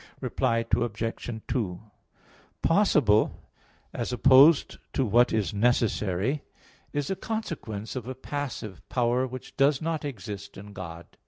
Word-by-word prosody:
Reply 115 0 0
Obj. 115 0 -3 0.2
2: 95 -8 -2 0.8
Possible, 150 - +3 0.5
as 120 - -3
opposed 135 +5 +6
to 135 - +1
what 120 +3 +4
is 105 -5 0
necessary, 110 +2 +1 0.5
is 145 +3 -2
a - - 0
consequence 165 - -5
of 125 -2 -5
a 130 - -4
passive 130 -8 -5
power, 125 +1 +1
which 130 0 -9
does 140 0 +4
not 160 -1 -2
exist 100 -7 -7
in 100 +1 -10
God. 85 -3 -9
120 Hz, 120 wpm, -27 LUFS, 105-140 Hz, 0.8 s, opposed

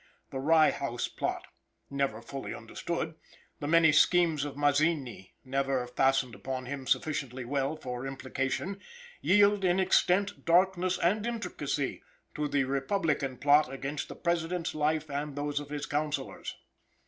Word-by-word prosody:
The 135 - -4
Rye 155 +2 +5
House 120 -4 -3
plot, - - -3 0.5
never 135 -5 -1
fully 135 +2 -6
understood; - - -4 0.5
the 145 - -3
many 165 0 +6
schemes 160 -1 +4
of 145 -1 -6
Mazzini, 145 - 0
never 135 -1 0
fastened 135 0 +1
upon 130 0 -5
him 135 0 -6
sufficiently 130 -5 -1
well 140 +3 -1
for 125 -3 -5
implication, 135 +8 -3 0.4
yield 205 0 +4
in 180 0 +3
extent, 190 +1 +2
darkness 185 +1 +3
and 205 +6 +1
intricacy, 235 -1 -3 0.3
to 150 0 -1
the 145 -1 +1
republican 140 0 -1
plot 145 0 +4
against 135 +2 -4
the - - -8
President's 170 0 -1
life 155 +1 0
and 145 0 -4
those 145 0 -1
of 145 -1 -8
his 145 0 -3
counselors. 145 -2 -3
145 Hz, 135 wpm, -30 LUFS, 135-165 Hz, 0.5 s, many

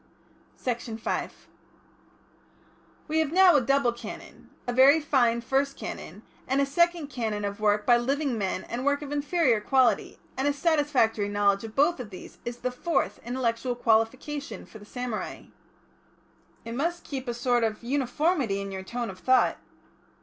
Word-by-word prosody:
Section 235 -2 -4
5 225 - -4 1.6
"We 315 +1 +1
have 315 -2 +1
now 365 -1 +6
a 290 - +5
double 265 -1 +2
Canon, 235 - -10 0.2
a 245 - -2
very 270 +5 +7
fine 245 -6 +2
First 275 +3 0
Canon, - - -7 0.2
and 270 +2 +1
a 280 - +3
Second 340 +1 +1
Canon 215 -5 -2
of 200 0 -4
work 210 0 +2
by 240 -1 +6
living 275 +2 0
men 195 -3 -2
and 240 +2 -5
work 285 +1 +1
of 285 - -7
inferior 290 -5 +2
quality, 260 +2 +2 0.2
and 265 +2 0
a 290 - +2
satisfactory 285 -9 +1
knowledge 205 0 +2
of 225 -1 -8
both 295 +3 +3
of 240 -4 -6
these 185 - -11
is 240 0 -4
the 250 - -1
fourth 330 +7 -1
intellectual 245 0 -1
qualification 235 +2 0
for 220 - -13
the 205 - -13
samurai." 245 -1 -5 1.2
"It 230 - -5
must 335 +7 -2
keep 270 -2 -6
a 240 - -1
sort 240 0 +1
of 220 0 -2
uniformity 270 - 0
in 200 0 -5
your 190 0 -5
tone 235 +3 -4
of 185 - -13
thought." 255 0 +3
250 Hz, 165 wpm, -27 LUFS, 225-285 Hz, 1.6 s, very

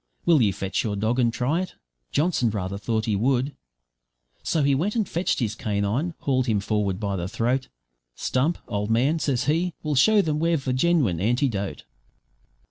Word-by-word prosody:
Will 165 -5 +5
you 105 -4 +3
fetch 95 0 -2
your 105 -3 -2
dog 110 +5 0
and 120 -2 +3
try 135 +9 0
it?' 185 - -6 0.4
Johnson 150 -6 +1
rather 100 -2 -3
thought 110 0 -1
he 110 - 0
would. 130 +6 +1 0.9
So 155 - 0
he 140 0 +3
went 180 - 0
and 220 -5 +1
fetched 175 +3 0
his 110 -5 -1
canine, 110 - -1
hauled 130 -2 +1
him 110 -3 +2
forward 100 -2 -1
by 100 -2 -2
the 90 -1 -3
throat. 120 +5 -1 0.5
`Stump, 145 +7 +1
old 105 +1 -2
man,' 130 +8 +2
says 135 -6 0
he, 165 +5 0
`we'll 150 - 0
show 205 +9 +5
them 150 -2 -1
we've 165 -3 +1
the 130 - 0
genwine 130 - +2
antidote.' 115 -3 0
125 Hz, 180 wpm, -25 LUFS, 105-155 Hz, 0.9 s, Will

